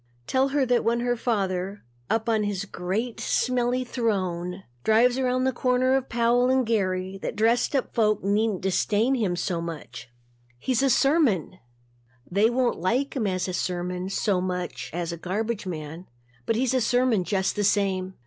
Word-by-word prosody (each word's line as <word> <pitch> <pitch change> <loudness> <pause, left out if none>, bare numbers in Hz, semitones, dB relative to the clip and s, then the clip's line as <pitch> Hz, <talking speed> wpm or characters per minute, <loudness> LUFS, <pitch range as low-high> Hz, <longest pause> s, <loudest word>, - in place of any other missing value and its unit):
Tell 265 - +2
her 275 0 +1
that 245 -1 +2
when 235 +1 +1
her 245 0 +1
father, 195 -4 -2 0.3
up 225 0 0
on 220 -2 +2
his 205 -2 -2
great 200 +6 -3
smelly 250 0 0
throne, 190 -7 -2 0.2
drives 245 +4 +4
around 255 0 +1
the 260 - +2
corner 255 +1 +1
of 265 -1 0
Powell 240 +1 +2
and 260 -1 +3
Geary 190 -3 -1
that - - -4
dressed 230 +5 +2
up 265 - -1
folk 215 -2 +2
needn't 205 0 +1
disdain 210 +6 +1
him 210 -9 0
so 175 -1 -2
much. 160 -8 -7 0.5
He's 250 - 0
a 275 - +3
sermon. 260 - +2 0.7
They 205 +5 +2
won't 245 0 0
like 250 - 0
him 230 -6 0
as 185 -1 -1
a 185 - -3
sermon 180 +1 -2
so 195 -1 0
much 180 -1 -4
as 170 0 -3
a 170 - -5
garbage 210 +4 -3
man 160 +1 -6 0.4
but 225 - +2
he's 250 +2 +1
a 255 - +2
sermon 245 -3 +2
just 190 +2 0
the 205 - 0
same. 190 -2 +1
215 Hz, 170 wpm, -25 LUFS, 185-245 Hz, 0.7 s, drives